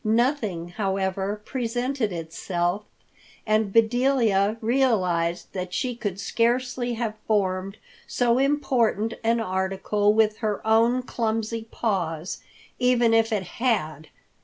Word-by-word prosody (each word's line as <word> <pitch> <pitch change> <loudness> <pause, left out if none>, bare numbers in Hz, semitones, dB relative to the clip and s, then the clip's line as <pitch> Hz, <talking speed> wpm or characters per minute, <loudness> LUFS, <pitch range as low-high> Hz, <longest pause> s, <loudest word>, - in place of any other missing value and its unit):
Nothing, 220 - 0
however, 195 0 -2
presented 245 -1 -2
itself, 175 +3 -2 0.6
and 215 -1 +1
Bedelia 230 -2 +3
realized 190 -9 +1
that 180 -1 -4
she 250 +7 -1
could 205 -5 -4
scarcely 245 +3 0
have 225 -2 -2
formed 195 -2 0 0.3
so 240 0 +2
important 255 -6 +1
an 230 +1 +2
article 195 +1 0
with 215 -1 +3
her 215 -3 -1
own 230 +3 +3
clumsy 225 -1 -2
paws, 175 -8 -2 0.4
even 245 -2 +3
if 225 0 +3
it 205 -3 0
had. 160 - -2
220 Hz, 110 wpm, -25 LUFS, 190-240 Hz, 0.6 s, Bedelia